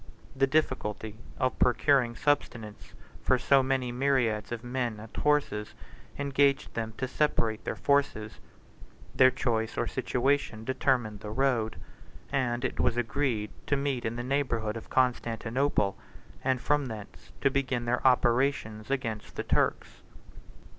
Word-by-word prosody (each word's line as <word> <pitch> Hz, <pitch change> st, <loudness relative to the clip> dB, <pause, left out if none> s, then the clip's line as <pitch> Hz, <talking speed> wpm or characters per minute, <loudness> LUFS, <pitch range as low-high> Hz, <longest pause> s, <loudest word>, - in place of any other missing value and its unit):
The 135 Hz, 0 st, +3 dB
difficulty 120 Hz, -7 st, -1 dB, 0.2 s
of 130 Hz, -1 st, 0 dB
procuring 125 Hz, -1 st, +3 dB
subsistence 120 Hz, -7 st, -2 dB, 0.3 s
for 130 Hz, -, +3 dB
so 135 Hz, +2 st, +4 dB
many 130 Hz, -1 st, 0 dB
myriads 120 Hz, -5 st, +1 dB
of 120 Hz, 0 st, -4 dB
men 120 Hz, -3 st, -2 dB
and 110 Hz, +1 st, -11 dB
horses 145 Hz, -8 st, 0 dB, 0.4 s
engaged 140 Hz, 0 st, +1 dB
them 110 Hz, -1 st, -3 dB
to 130 Hz, -, -2 dB
separate 115 Hz, -6 st, 0 dB
their -, -, -2 dB
forces: 140 Hz, -7 st, 0 dB, 0.7 s
their 130 Hz, 0 st, +7 dB
choice 110 Hz, -3 st, -1 dB
or 120 Hz, -, +1 dB
situation 130 Hz, -2 st, 0 dB
determined 125 Hz, -5 st, 0 dB
the 105 Hz, -, -7 dB
road; 120 Hz, -2 st, +1 dB, 0.6 s
and 125 Hz, -3 st, 0 dB
it -, -, -3 dB
was 120 Hz, -, +2 dB
agreed 120 Hz, -3 st, -1 dB, 0.2 s
to 145 Hz, -, +2 dB
meet 140 Hz, -3 st, -1 dB
in 110 Hz, +1 st, -2 dB
the 120 Hz, -, -4 dB
neighborhood 120 Hz, -5 st, -1 dB
of 115 Hz, -, -8 dB
Constantinople, 120 Hz, -2 st, +1 dB, 0.5 s
and 130 Hz, -1 st, +1 dB
from 145 Hz, -2 st, +1 dB
thence 110 Hz, -3 st, -9 dB
to 135 Hz, -, +3 dB
begin 130 Hz, -3 st, -1 dB
their 120 Hz, +1 st, 0 dB
operations 120 Hz, -3 st, +2 dB
against 115 Hz, -6 st, -3 dB
the -, -, -3 dB
Turks. -, -, 0 dB
125 Hz, 135 wpm, -29 LUFS, 110-135 Hz, 0.7 s, their